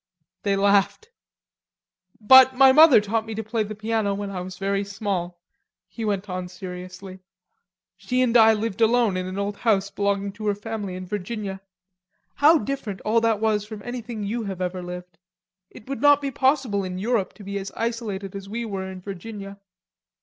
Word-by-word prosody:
They 200 -1 +1
laughed. 200 - +2 1.1
"But 260 +4 +7
my 265 0 +7
mother 305 -3 +8
taught 220 +2 -1
me 220 -1 -7
to 225 - -3
play 220 +1 -2
the 215 0 -4
piano 215 -1 -1
when 200 0 -5
I 185 -2 -4
was 180 0 -8
very 195 +1 -1
small," 195 -3 -4 0.5
he 225 +5 -7
went 205 -2 -1
on 180 -1 -4
seriously. 185 +1 -9 0.8
"She 255 0 0
and 245 -1 0
I 225 -1 +7
lived 220 0 -3
alone 225 -3 +3
in 185 0 -3
an 185 +1 -6
old 200 0 -3
house 200 -4 +1
belonging 200 0 -1
to 210 +2 -6
her 205 - +1
family 205 -2 -5
in 185 0 -6
Virginia. 200 0 -5 0.7
How 310 +3 +5
different 260 -9 -4
all 225 +2 +2
that 225 -2 +1
was 215 -2 +1
from 210 -1 -9
anything 240 -3 -6
you 220 +3 -3
have 190 -2 -5
ever 180 0 -3
lived. 180 -1 -9 0.5
It 215 - -15
would 275 0 -5
not 290 0 +6
be 280 -1 -3
possible 260 -7 +1
in 185 -1 -5
Europe 215 0 -1
to 210 - -13
be 200 0 -4
as 195 - -7
isolated 220 -4 -3
as 195 0 -8
we 235 +3 -4
were 190 -3 -4
in 185 -1 -9
Virginia.... 200 +1 -8
205 Hz, 185 wpm, -24 LUFS, 195-230 Hz, 1.1 s, mother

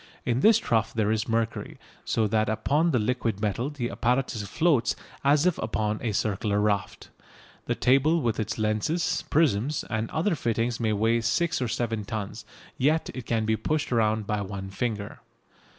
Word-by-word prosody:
In 120 0 +1
this 220 +9 +6
trough 110 -2 0
there 110 -1 +1
is 110 -1 0
mercury, 115 0 -2 0.3
so 110 - +1
that 110 +1 +1
upon 140 +10 +1
the 140 - +2
liquid 115 -2 -1
metal 110 +5 -1
the 135 -5 -4
apparatus 125 -2 0
floats 135 0 +2 0.3
as 145 +3 +4
if 180 -2 +2
upon 110 -1 -1
a 115 - -1
circular 105 0 0
raft. 100 -3 -1 0.6
The - - 0
table 140 +6 +3
with 115 -6 -1
its 110 - -2
lenses, 110 +11 0
prisms 145 -2 +1
and 110 0 -1
other 170 +5 0
fittings 115 -4 -1
may 110 -2 +1
weigh 115 +3 +2
six 165 +8 0
or 125 - 0
seven 115 -2 -2
tons, 105 +2 -5 0.3
yet 155 +5 +2
it 130 -3 -7
can 115 -2 0
be 110 0 +2
pushed 155 +5 -2
round 110 -2 +2
by 105 0 -1
one 95 -1 -6
finger. 105 -1 -3
115 Hz, 170 wpm, -26 LUFS, 110-135 Hz, 0.6 s, this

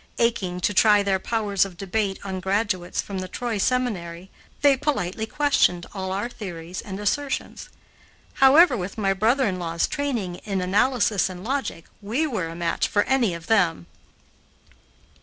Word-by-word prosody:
Aching 200 -6 0
to 205 - +1
try 210 0 +5
their 195 -1 +1
powers 205 -3 0
of 190 -3 -7
debate 195 +1 -1
on 190 -1 -4
graduates 190 -2 -1
from 195 -2 -5
the 185 - -4
Troy 225 +3 -3
Seminary, 190 -8 -1 0.3
they 285 -1 +6
politely 220 -7 -2
questioned 220 -11 +2
all 190 -2 -4
our 200 +4 -2
theories 180 -6 -7
and 195 -1 -7
assertions. 270 +7 -2 0.7
However, 280 +2 +7
with 190 -1 -5
my 195 -3 +1
brother 235 +7 +2
in 185 -3 -1
law's 165 -1 -1
training 235 -11 -2
in 195 -1 -3
analysis 205 +2 +2
and 180 0 -8
logic, 260 -9 -3 0.2
we 230 +10 -1
were 220 - -2
a 165 - -7
match 170 0 0
for 205 - +2
any 245 -9 +1
of 165 -1 -9
them. 180 - +2
200 Hz, 160 wpm, -24 LUFS, 185-235 Hz, 0.7 s, However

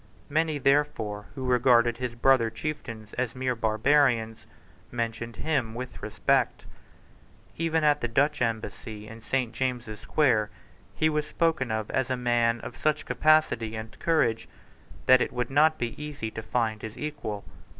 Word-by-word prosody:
Many, 155 0 +1
therefore, 135 -8 +1
who 130 -2 -5
regarded 120 -2 +4
his 125 -1 -4
brother 120 -1 +4
chieftains 115 -4 -6
as 125 -2 -1
mere 130 0 0
barbarians, 115 0 +2 0.4
mentioned 115 -1 -3
him 130 -6 -1
with 125 +1 -7
respect. - - 0 0.9
Even 165 -1 0
at 150 -1 +3
the 120 - 0
Dutch 145 +5 +1
Embassy 110 -2 -3
in 115 +1 -10
St. 125 0 -1
James's 120 -4 -3
Square 115 -6 +2 0.5
he 155 - +2
was 150 -1 0
spoken 160 -6 0
of 110 -1 -2
as 130 -1 0
a 130 - 0
man 120 -1 +2
of - - -8
such 150 0 0
capacity 155 -8 +2
and 110 0 -8
courage 140 -9 +1 0.6
that 130 -1 +7
it - - 0
would 125 +1 -3
not 155 +3 +4
be 120 +5 -4
easy 145 -7 -5
to 110 - -6
find 110 -2 -1
his 110 0 -7
equal. 145 -9 -5
125 Hz, 150 wpm, -27 LUFS, 115-145 Hz, 0.9 s, that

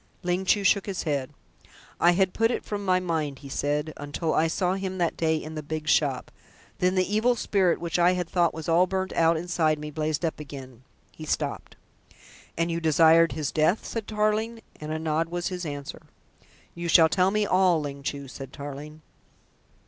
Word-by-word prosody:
Ling 180 +2 -1
Chu 200 +1 +3
shook 195 +1 +3
his 195 -3 -3
head. 140 -4 -1 0.7
"I 175 +1 +5
had 190 0 +1
put 225 0 +2
it 240 - -3
from 205 -1 -4
my 185 -1 +2
mind," 160 -6 -2
he - - -8
said, 150 +3 -1
"until 145 +3 -3
I 160 - +3
saw 180 +2 0
him 190 -1 -4
that 170 -2 0
day 160 -1 +1
in 155 0 -5
the 155 - -4
big 155 +1 -5
shop. 145 -4 +1 0.5
Then 180 +1 +2
the 185 0 +3
evil 240 +3 +3
spirit 190 -6 +1
which 170 0 -2
I 175 +1 +5
had 180 -1 -2
thought 175 -1 +2
was 160 -1 -7
all 170 +2 +4
burnt 190 0 -2
out 165 0 +3
inside 160 -2 0
me, 150 0 -7
blazed 155 +1 -1
up 160 - -3
again." 135 -4 -9 0.3
He - - -10
stopped. - - -3 0.8
"And 165 +1 0
you 165 0 -2
desired 165 +1 +5
his 150 -3 -2
death?" 160 +7 +1
said 225 -3 -5
Tarling, 215 +1 -1
and 155 0 -6
a 155 - -1
nod 160 +1 -1
was 175 0 -2
his 180 -2 -4
answer. 145 -1 -6 0.7
"You 170 0 -5
shall 165 -1 +7
tell 180 +3 +2
me 210 +1 +1
all, 185 -3 +3
Ling 140 -2 -6
Chu," 140 0 -4
said 135 0 -9
Tarling. 145 +2 -8
165 Hz, 195 wpm, -26 LUFS, 150-185 Hz, 0.8 s, shall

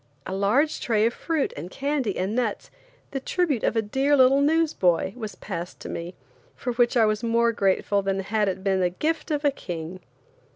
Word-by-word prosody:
A 190 - -4
large 215 +11 +2
tray 220 -2 +2
of 230 - +1
fruit 320 -4 -1
and 165 +5 -7
candy 275 -4 -2
and 190 +3 -1
nuts, 230 -3 -2 0.4
the 270 - -2
tribute 295 - 0
of - - +1
a 225 - +2
dear 270 +7 +2
little 265 +1 +5
newsboy, 285 - +2
was 220 -4 -6
passed 180 -3 -6
to - - -7
me, 170 +2 -6 0.4
for 245 - -3
which 240 +1 +2
I 225 - +5
was 215 0 0
more 235 0 +2
grateful 200 -1 +1
than 195 0 -1
had 210 +1 0
it 190 0 -5
been 195 -1 +1
the 180 - +2
gift 320 - -2
of 295 -1 -1
a 285 - +5
king. 175 - -6
225 Hz, 200 wpm, -25 LUFS, 195-275 Hz, 0.4 s, little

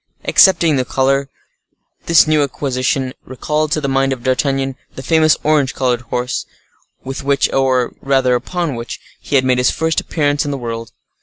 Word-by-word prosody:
Excepting 170 -6 +4
the 130 - +1
color, 135 +2 0 0.8
this 170 -2 +6
new 155 -1 +2
acquisition 130 -1 -1
recalled 150 +4 -2
to - - 0
the 145 - -3
mind 135 0 +1
of 125 -2 -9
D'Artagnan 135 +1 0 0.2
the 130 - -8
famous 155 +2 +3
orange 150 -3 +1
colored 125 -3 0
horse, 125 +1 -3 0.6
with 135 +1 -6
which, 140 0 +1
or 130 -2 +1
rather 135 -2 +2
upon 170 +5 -2
which, 115 0 -6 0.2
he - - -3
had 130 -1 +3
made 125 -1 +2
his 125 - +3
first 160 0 0
appearance 145 -2 0
in 145 - -4
the 140 - -3
world. 115 -2 -6
135 Hz, 170 wpm, -17 LUFS, 130-150 Hz, 0.8 s, this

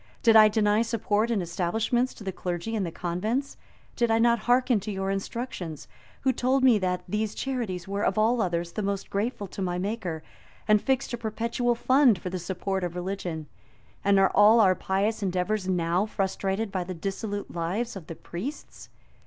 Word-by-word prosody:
Did 225 -2 +6
I 215 -1 +9
deny 210 0 +2
support 225 -1 0
and 215 -6 0
establishments 220 +9 0
to - - -11
the 195 - -3
clergy 180 +5 -4
and 210 - 0
the 170 - -3
convents? 215 - -2 0.4
Did 235 -1 +1
I 225 - +3
not 235 0 +4
hearken 250 -2 +4
to 205 +2 -5
your 195 0 -2
instructions, 195 - -5 0.3
who 260 0 +2
told 260 +2 +1
me 245 -5 +6
that 180 -1 -1
these 210 +3 -2
charities 225 -10 -3
were, 200 +1 -2
of - - +1
all 225 +2 +3
others, 170 -2 -1
the 215 - -3
most 200 -1 -3
grateful 205 +1 -2
to 195 - -7
my 180 -1 -1
Maker, 180 -5 -3 0.4
and 210 -1 +5
fixed 265 -2 0
a 240 - -3
perpetual 235 +2 -1
fund 255 -2 +4
for 180 +1 -6
the 185 - -3
support 190 +2 -3
of 175 -1 -3
religion? 180 -3 -4 0.6
And 200 0 +4
are 195 0 +4
all 215 +3 +7
our 190 -4 +6
pious 200 +4 -1
endeavors 190 +1 -1
now 180 +2 +1
frustrated 195 +1 -2
by 185 -2 -1
the 185 +1 -6
dissolute 200 +3 -4
lives 190 +8 -2
of 180 -5 -9
the 165 - -7
priests? 205 - -7
200 Hz, 185 wpm, -27 LUFS, 180-230 Hz, 0.6 s, I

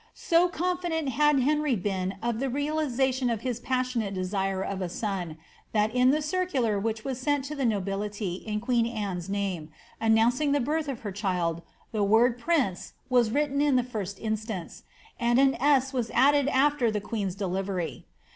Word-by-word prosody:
So 340 +1 +3
confident 350 -3 -1
had 295 +1 +3
Henry 295 0 +2
been 190 -1 -2
of 235 -1 -1
the 270 +1 -1
realisation 270 -3 0
of 225 -2 -1
his 245 -2 -2
passionate 250 -5 -1
desire 190 +1 -1
of 195 -1 -4
a 180 - -2
son, 185 -6 -3 0.4
that 215 0 +2
in 250 0 +4
the 300 +3 +2
circular 290 - 0
which 220 +1 -3
was 265 -2 -3
sent 290 -1 0
to 300 +2 -5
the 275 -3 -1
nobility 200 -1 -2
in 210 +1 -4
queen 235 -1 +1
Anne's 200 -6 -4
name, 195 -6 -2 0.3
announcing 235 +6 +3
the 290 - +3
birth 300 +4 -1
of 265 -4 -4
her 205 - -4
child, 180 -4 -1 0.3
the 215 -3 0
word 230 +4 +4
prince 255 - 0 0.2
was 245 -3 +4
written 285 +3 +1
in 290 -2 +3
the 250 - +3
first 205 -5 -5
instance, 215 -4 -4 0.4
and 240 0 +2
an 270 0 +4
8 270 -2 +3
was 240 -3 -1
added 280 +2 +5
after 285 -3 +3
the 210 -1 -1
queen^s 200 -3 -3
deli 190 -1 -1
very. 185 -4 -4
235 Hz, 175 wpm, -27 LUFS, 200-275 Hz, 0.4 s, added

